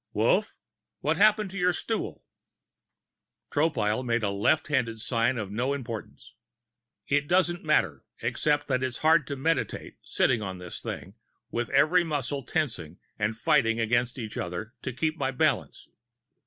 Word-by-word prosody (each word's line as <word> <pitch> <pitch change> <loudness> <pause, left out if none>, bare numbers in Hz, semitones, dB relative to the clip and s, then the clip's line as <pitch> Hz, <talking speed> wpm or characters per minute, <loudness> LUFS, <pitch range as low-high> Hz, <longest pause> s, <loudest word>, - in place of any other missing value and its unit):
"Wolf, - - +2 0.5
what - - +1
happened 215 -1 +4
to 195 - -5
your 180 0 +3
stool?" - - -3 1.3
Tropile 130 -7 +1
made 120 -2 0
a 100 - +1
left 100 +10 +2
handed 115 -6 0
sign 115 +2 +1
of 105 -3 -4
no 125 +6 0
importance. 115 -5 -7 0.7
"It 145 0 +1
doesn't 175 0 +2
matter. 95 - +1 0.2
Except 145 -1 0
it 130 -1 +2
is 130 -2 -2
hard 160 -3 +5
to 140 - -3
meditate, 160 +5 -2
sitting 120 -4 +1
on 95 -3 -4
this 90 -1 -7
thing, 95 - -6 0.4
with 120 0 -2
every 180 +3 +4
muscle 145 -3 -2
tensing 120 - -2 0.2
and 110 +1 0
fighting 115 0 +3
against 120 +2 +1
every 110 -3 -4
other 90 +7 -5
to - - -3
keep 155 +6 -1
my 130 - +1
balance...." 130 - 0
130 Hz, 150 wpm, -27 LUFS, 110-155 Hz, 1.3 s, hard